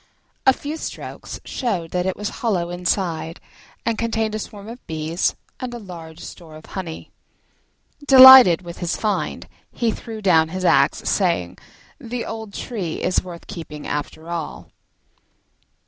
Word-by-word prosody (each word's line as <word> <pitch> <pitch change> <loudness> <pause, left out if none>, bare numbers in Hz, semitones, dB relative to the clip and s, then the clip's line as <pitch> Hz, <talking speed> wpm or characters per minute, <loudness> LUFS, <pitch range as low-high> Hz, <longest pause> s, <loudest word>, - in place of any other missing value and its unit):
A - - +9
few 295 +4 -6
strokes - - -7
showed 185 -11 -2
that 180 0 -1
it 190 - -2
was 210 0 -3
hollow 180 -7 0
inside 175 -2 -2 0.5
and 230 -2 0
contained 225 -2 -1
a 215 - -2
swarm 205 -1 -8
of 235 +2 -11
bees 160 +2 -1 0.2
and 255 -1 -4
a - - -4
large 170 -6 -10
store 160 -3 -11
of 155 - -12
honey. 175 -4 -7 1.0
Delighted 260 - +10
with 170 -1 -9
his 175 -2 -2
find 210 -2 -2 0.2
he 235 -2 0
threw 225 0 -7
down 165 -6 +4
his 185 +2 -4
axe, - - +3
saying, - - 0 0.4
"The 245 -3 -5
old 220 -2 -6
tree 190 -10 -4
is 185 - +1
worth 175 -2 -10
keeping 150 -3 -8
after 150 +2 -4
all." 170 -2 -5
185 Hz, 145 wpm, -22 LUFS, 165-225 Hz, 1.0 s, Delighted